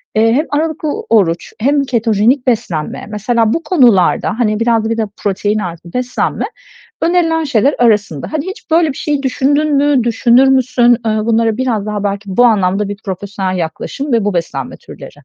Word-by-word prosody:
hem 225 +8 +2
aralıklı 310 0 -1 0.2
oruç, 175 -6 +1
hem 280 +4 +2
ketojenik 235 0 +1
beslenme, 210 -11 -2
mesela 220 +1 0
bu 330 - -2
konularda, 240 - +2
hani, 215 -2 +1
biraz 230 -1 +1
da - - -1
bir 230 - -1
de 220 - 0
protein 205 +1 -1
artı 170 -2 -7
beslenme 250 0 -2 0.6
önerilen 330 -1 +1
şeyler 275 0 +2
arasında. 210 - +1
Hani, 310 +2 -2
hiç 380 -4 -9
böyle 330 0 +4
bir - - -14
şeyi 290 -2 -2
düşündün 285 +3 +1
mü, 280 -4 +2
düşünür 240 +3 +3
müsün? 250 -2 +3
Bunlara 220 0 +1
biraz 235 -5 -1
daha 210 -1 -3
belki, 200 +1 -2
bu 245 - +5
anlamda 200 -3 +2
bir 205 - -5
profesyonel 190 -1 -4
yaklaşım 210 - -4
ve 230 -3 +2
bu 205 -2 -1
beslenme 140 -6 -3
türleri. - - -12
230 Hz, 165 wpm, -14 LUFS, 205-270 Hz, 0.6 s, bu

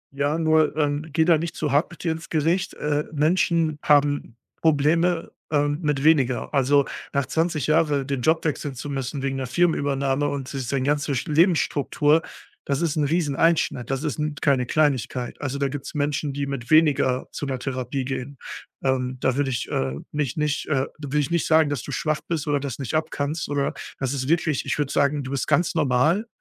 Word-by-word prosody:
Ja, 145 +3 0
nur, 155 -2 +2
ähm, 145 0 0
gehe 160 +2 +2
da 165 -2 +4
nicht 170 +1 -4
zu 150 -3 -2
hart 145 +4 +2
mit 175 - -12
dir 165 - +1
ins 160 +1 -6
Gericht, 165 +4 0
äh, 150 0 -1
Menschen 160 0 +1
haben 145 -5 +2 0.2
Probleme, 165 +3 +2 0.2
ähm, 145 0 +1
mit 150 -4 0
weniger. 140 -6 +2
Also, 140 0 +3 0.3
nach 140 -1 +1
20 160 +1 0
Jahre 150 -3 +2
den 135 -2 -2
Job 160 +6 +2
wechseln 145 -2 -2
zu 145 +4 -6
müssen 135 0 -3
wegen 135 -1 -1
'ner 130 -2 -3
Firmenübernahme 140 -3 +1
und 140 -1 -5
s 130 -3 -4
sein 135 -2 0
ganze 145 0 0
Lebensstruktur, 155 -2 +2 0.4
das 140 +1 -1
ist 165 -3 0
'n 155 - +1
riesen 150 -2 0
Einschnitt, 160 -7 +1
das 135 +1 -2
ist 155 -1 -3
'n 150 -1 -2
keine 130 -4 +2
Kleinigkeit. 130 -5 0
Also, 140 -1 -2
da 140 0 0
gibt's 135 +1 -6
Menschen, 145 0 -1
die 140 +1 -3
mit 135 -3 -5
weniger 145 -5 +3
zu 145 - -5
'ner 130 - -2
Therapie 130 0 -3
gehen, 135 +1 -5 0.5
ähm, 130 -1 0
da 130 0 +1
würde 140 -1 0
ich, 120 - -2
äh, 65 0 -1 0.2
mich 150 -1 -2
nicht 150 -1 -1
äh, 135 -2 +1
da 145 - -6
würde 145 +2 -1
ich 145 0 -1
nicht 170 -1 +1
sagen, 160 -2 +4
dass 140 - -2
du 145 - -7
schwach 155 +4 -1
bist 165 -4 -2
oder 145 -1 +2
das 140 -1 -5
nicht 135 -2 -5
abkannst 155 -1 -2
oder 140 -1 0 0.3
das 135 0 -1
ist 130 -2 -3
wirklich 160 -3 +1
ich 135 - -1
würde 145 -2 -1
sagen, 140 0 +2
du 130 - -6
bist 140 - -2
ganz 175 - +2
normal. 150 - +2
145 Hz, 200 wpm, -24 LUFS, 135-155 Hz, 0.5 s, da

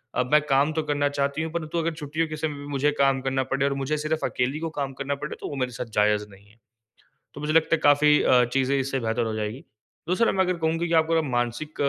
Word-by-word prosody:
अब 125 0 -1
मैं 150 0 +6
काम 140 +3 +3
तो 160 - 0
करना 145 -1 0
चाहती 140 +1 -1
हूँ 160 - -4
परंतु 170 0 -3
अगर 165 0 -1
छुट्टियों 155 +1 -2
के 155 - -5
समय 155 -1 -2
भी 145 - -8
मुझे 145 +1 +1
काम 135 -1 +3
करना 135 0 0
पड़े 135 +1 +1
और 140 - +1
मुझे 140 +3 -1
सिर्फ़ 155 +1 -1
अकेली 130 +5 -1
को 165 0 -3
काम 140 -2 -2
करना 140 +1 -3
पड़े 150 +2 -6
तो - - -4
वो 145 - -5
मेरे 130 -2 -2
साथ 120 - -5
जायज़ 105 0 +3
नहीं 100 0 -17
है। 105 - -23 0.8
तो 145 - -9
मुझे 150 +1 -1
लगता 165 +1 +4
है - - -5
काफ़ी 150 +1 +5
अ, 125 -1 +5
चीज़ें 135 +1 +1
इससे 135 0 -1
बेहतर 115 0 -1
हो 110 - -2
जाएँगी। 110 +4 -4 0.5
दूसरा 225 +6 +3
मैं 190 - +2
अगर 180 -1 -1
कहूँ 160 0 0
कि 170 0 -2
आपको 160 0 +3
मानसिक 120 +3 -2
145 Hz, 255 wpm, -25 LUFS, 130-155 Hz, 0.8 s, मैं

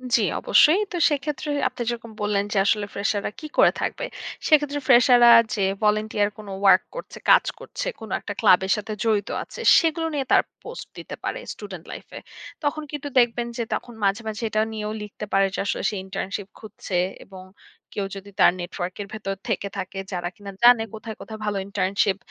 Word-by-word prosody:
জি 230 - +3 0.2
অবশ্যই। 320 +6 +5
তো 355 - -3
সেক্ষেত্রে 295 +1 -3 0.2
আপনি - - -7
যেরকম 230 -1 -5
বললেন 205 -1 +1
যে 205 - 0
আসলে 205 0 +2
fresher 205 +1 0
রা - - -2
কি 310 - -9
করে - - +7
থাকবে? - - -2 0.4
সেক্ষেত্রে 295 -2 +3
fresher 245 -1 +7
রা 235 - +9 0.2
যে 210 - -1 0.2
volunteer 210 0 +2
কোনো 210 -2 -9
work 195 - +7
করছে, - - -8
কাজ - - +7
করছে, - - -6
কোনো 220 -3 -9
একটা 205 - -6
ক্লাবের 190 -2 +4
সাথে 210 +1 -5
জড়িত 215 -3 +1
আছে, - - -12 0.2
সেগুলো 325 -1 0
নিয়ে 280 -2 -1
তারা - - +6 0.2
পোস্ট 475 +2 -8
দিতে - - -7
পারে - - -3
student 190 -5 -9
life - - -9
এ। - - -5 0.4
তখন 305 +1 -1
কিন্তু 290 -1 -5
দেখবেন 240 0 +1
যে 235 - 0
তখন 240 - -4
মাঝে, 200 +3 +2
মাঝে 215 +1 -4
এটা 215 0 +1
নিয়েও 210 -1 -4
লিখতে 210 0 -7
পারে 195 0 +4
যে - - -3
আসলে - - -2
সে 210 - -5
internship 195 +1 -4
খুঁজছে 205 -4 -5 0.3
এবং 190 -1 -11 0.5
কেউ 200 - -1
যদি 200 +1 -11
তার - - +7
নেটওয়ার্কের 185 +2 -5
ভেতর 195 -2 -4
থেকে 200 -2 -1
থাকে 195 0 -5
যারা 175 -1 -2
কিনা 200 -1 -9
জানে 240 -2 +7
কোথায়, 220 0 -7
কোথায় 220 -1 -8
ভালো 205 -1 -1
internship 195 0 +1
215 Hz, 190 wpm, -24 LUFS, 200-240 Hz, 0.5 s, রা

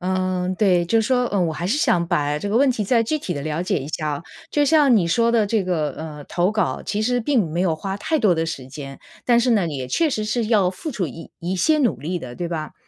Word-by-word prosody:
嗯， 185 0 -1
对。 185 -5 +3
就 225 +6 +2
说， 250 +2 +1
呃， 200 - 0
我 170 -3 +1
还 170 +3 -4
是 245 +10 +1
想 170 - +2
把 150 -4 0
这 200 - -4
个 220 - +1
问 275 +1 +4
题 225 -4 -1
再 230 +3 +3
具 305 +7 -1
体 185 - -4
地 145 - -4
了 155 +3 -2
解 180 - 0
一 140 0 -7
下 155 -1 -2
啊。 145 +2 -4 0.3
就 295 - +2
像 290 -3 +5
你 185 -6 +3
说 230 +7 +2
的 225 -3 +3
这 205 -1 0
个， 160 -5 0
呃， 150 -2 -7
投 180 +3 0
稿 215 0 -1
其 210 - -2
实 245 +3 +1
并 225 - +1
没 170 +3 -2
有 170 -4 +1
花 195 +4 -4
太 315 +9 -1
多 205 -8 +3
的 165 0 0
时 140 -6 -5
间。 135 0 -8 0.3
但 240 -1 +4
是 245 +1 +1
呢， 205 -7 +3
也 130 -4 -5
确 320 - +1
实 215 -4 -2
是 220 +1 -1
要 210 -5 +3
付 190 - -6
出 200 - -2
一 165 +4 -10
一 180 +3 -3
些 310 - +3
努 255 -6 +1
力 175 +4 -3
的， 125 -5 -8
对 175 - -3
吧？ 160 -3 -4
185 Hz, 290 characters per minute, -22 LUFS, 165-230 Hz, 0.3 s, 像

